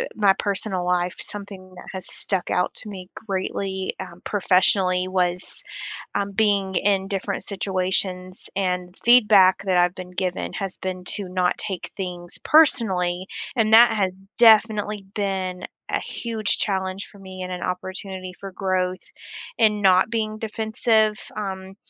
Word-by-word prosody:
uh, - - -1
my 205 -3 +4
personal 195 -2 -1
life, 180 0 0
something 195 -2 -7
that 180 - -11
has 190 -1 -5
stuck 190 -3 -3
out 180 - +1
to 220 - -7
me 185 -3 -9 0.2
greatly, 190 -1 -2
um, 180 -2 -9
professionally 185 -2 +2
was, 180 -1 -1 0.5
um, 200 0 -1
being 200 -2 +1
in 195 -1 +2
different 195 0 -2
situations 185 -1 -2
and 180 -1 -1
feedback 210 -7 +6
that 190 -2 +1
I've 175 0 +3
been 180 -1 -9
given 180 -1 -2
has 195 -3 -4
been 185 -1 -5
to 200 -3 -5
not 180 -1 0
take 190 -4 -4
things 175 -2 -5
personally. 190 - +3 0.3
And 220 -2 +3
that 235 +1 +8
has 195 -4 +1 0.3
definitely 215 -3 +5
been 190 -3 -2 0.3
a - - 0
huge 225 -3 -1
challenge 190 -1 -1
for 200 - -17
me 190 -1 -9
and 185 - -5
an 180 -1 -5
opportunity 185 0 -5
for 195 -1 -8
growth 185 -1 -1 0.6
and 215 -3 +4
not 190 +1 +4
being 215 -2 -1
defensive. 220 0 +1 0.2
Um, 190 -2 -5
190 Hz, 145 wpm, -23 LUFS, 185-205 Hz, 0.6 s, that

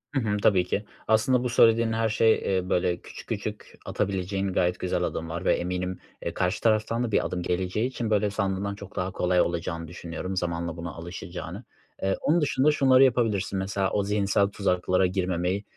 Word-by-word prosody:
Hı - - +3
hı, 105 -2 0
tabii 95 -4 +4
ki. 105 - -2 0.2
Aslında 120 +3 +3
bu 125 - 0
söylediğin 115 -1 +4
her 110 0 +1
şey, 110 -3 +2
ııı, 90 0 -3
böyle 90 0 +1
küçük - - -11
küçük - - -5
atabileceğin 95 0 -2
gayet 90 0 +1
güzel 90 - -1
adımlar 85 +3 -3
ve - - +4
eminim 90 +1 -3 0.2
e, - - -3
karşı 90 +3 -1
taraftan 115 +1 +2
da 115 - -2
bir - - +2
adım 90 - -3
geleceği 95 +7 -1
için 120 -3 -4
böyle 105 -1 +2
sandığından 100 0 -2
çok 100 -1 -11
daha 90 +1 -2
kolay 90 -1 +2
olacağını 85 -1 -2
düşünüyorum 90 +2 -6
zamanla 85 -1 -2
buna 85 0 -5
alışacağını. 85 +3 -7 0.4
Eee, 95 0 +1
onun 165 +3 +3
dışında 145 0 +3
şunları 135 -2 +5
yapabilirsin: 115 -7 +1
Mesela, 95 0 -1
o 100 - +1
zihinsel 100 0 +2
tuzaklara 95 -2 +1
girmemeyi, 90 +1 -1
95 Hz, 180 wpm, -26 LUFS, 90-110 Hz, 0.4 s, şunları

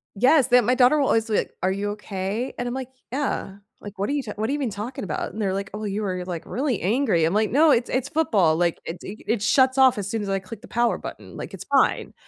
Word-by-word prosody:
Yes, 260 +5 +4
the 250 -1 +6
my 245 +3 +2
daughter 255 +3 +5
will 275 - +2
always 225 0 +2
be 215 - +2
like, - - -2
"Are 185 - +1
you 200 +1 -2
okay?" 205 +3 -4
And 245 - -3
I'm 245 - -3
like, 260 -1 -5 0.2
"Yeah, 260 -7 -2 0.2
like, 205 -1 -9
what 200 - -1
are - - 0
you 290 -2 -1
t 215 - -6
what 220 +3 -2
are - - 0
you 290 - 0
even 275 -5 -1
talking 210 +4 -5
about?" 190 - -3
And 220 - -5
they're 195 -2 0
like, 195 0 -3
"Oh, 210 +1 -5
you 205 0 -2
were 185 -3 -2
like 175 -3 -5
really 260 -3 -2
angry." 210 - +2
I'm 165 - 0
like, 215 +1 +1
"No, 300 +3 +5
it's 235 -1 +2
it's 255 -1 -1
football, 205 - +2
like 170 0 0
it's 170 - -7
e 210 +3 -8
it 225 -2 0
shuts 260 +4 +3
off 260 -3 +5
as 200 -1 -3
soon 225 0 -2
as 200 - -4
I 195 0 0
click 200 +3 -10
the 240 - -12
power 240 0 +1
button, - - -9
like, - - -7
it's - - -8
fine." - - +2
220 Hz, 285 wpm, -24 LUFS, 195-255 Hz, 0.2 s, the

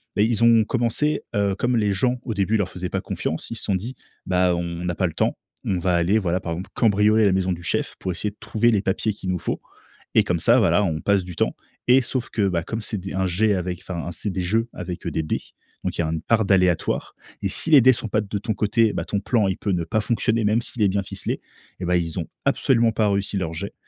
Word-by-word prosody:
bah, 105 - +2
ils 115 +1 +2
ont 115 -1 +6
commencé, 125 +6 0
heu, 100 -1 +1
comme 120 +3 0
les 105 -2 +2
gens, 125 +6 0
au 115 - -3
début, 105 +2 +1
leur 95 -3 -1
faisaient 90 -1 -5
pas - - -1
confiance, 80 - -4
Ils 115 - -5
se - - -7
sont 100 - 0
dit: 115 +8 -4 0.3
«Bah, 90 -1 +2
on - - -2 0.2
on - - -4
n'a 85 -1 -1
pas 95 - +1
le 80 - -6
temps. - - 0 0.3
On 95 - 0
va 90 0 +1
aller, 85 +5 +3
voilà, 90 -3 0
par 85 - -4
exemple, 90 +3 -6
cambrioler 110 0 +3
la 100 - +4
maison 95 -1 +1
du 85 - -7
chef - - -1
pour 95 - -2
essayer 100 +4 -3
de - - -26
trouver 120 +2 +1
les 105 -4 +2
papiers 105 +2 0
qu'il 95 - -6
nous 90 - 0
faut - - -3 0.5
et 110 - +6
comme 90 -5 -1
ça, 120 +9 +5
voilà, 105 -2 +3
on 80 -4 -1
passe 100 -2 +2
du 90 -1 -8
temps» - - 0 0.3
et 130 +2 +7
sauf 125 0 -3
que, 100 -3 +1
bah, 85 -2 0
comme 110 +6 -4
c'est 105 -1 -4
des 95 +1 -6
un 95 0 +1
jet 105 +4 +2
avec 90 -1 -3
enfin, 85 -2 -5
c'est 100 +5 -3
des 95 -1 -2
jeux 115 +5 +1
avec, 90 -1 -6
heu, - - -1
des 80 - -1
dés - - -2 0.4
donc - - -3
il - - +2
y - - -1
une 80 0 -2
part 115 -2 +2
d'aléatoire 90 -3 +1 0.3
et 100 - 0
si 160 - +3
les 140 - +10
dés 130 +2 +7
sont 115 - -4
pas 105 - +1
de 100 -1 -4
ton 110 +2 -2
côté, 110 +1 +2
bah, - - -3
ton 100 - -1
plan, 110 -2 +1
il 95 - -1
peut 100 - -1
ne 85 - 0
pas 110 +6 0
fonctionner, 115 0 0
même 110 +3 +2
s'il 120 - -7
est 105 - +5
bien 100 +1 0
ficelé. - - -3 0.4
Eh - - -3
ben, 90 - +2
ils 85 0 -1
ont 80 - -6 0.2
absolument 120 -4 +3
pas 105 -1 +1
réussi 100 0 -1
leur 80 -4 -2
jet. 100 +5 -5
100 Hz, 270 wpm, -23 LUFS, 90-110 Hz, 0.5 s, les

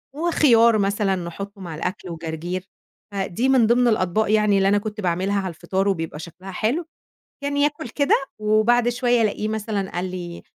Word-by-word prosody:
وخيار 245 -9 +4
مثلًا 200 -1 +1
نحُطّه 195 +3 -7
مع 170 -4 -6
الأكل 180 +3 -4
وجرجير، 165 +2 -5 0.5
فدي 200 +5 -1
من 255 -4 +5
ضمن 245 +1 +4
الأطباق 215 0 +1
يعني 210 -2 +3
اللي 195 0 +3
أنا 205 +1 +4
كنت 210 +1 -4
باعملها 190 +2 0
على 190 - -3
الفطار 190 +4 -2
وبيبقى 165 -5 -2
شكلها 180 +4 -9
حلو. 235 - -1 0.6
كان 285 0 -1
ياكُل 290 -3 0
كده 285 +4 +2 0.3
وبعد 215 +3 +3
شوية 245 -1 +2
ألاقيه 215 0 0
مثلًا 215 -2 -3
قال 175 +1 -2
لي: 175 -2 -7
205 Hz, 165 wpm, -22 LUFS, 185-235 Hz, 0.6 s, من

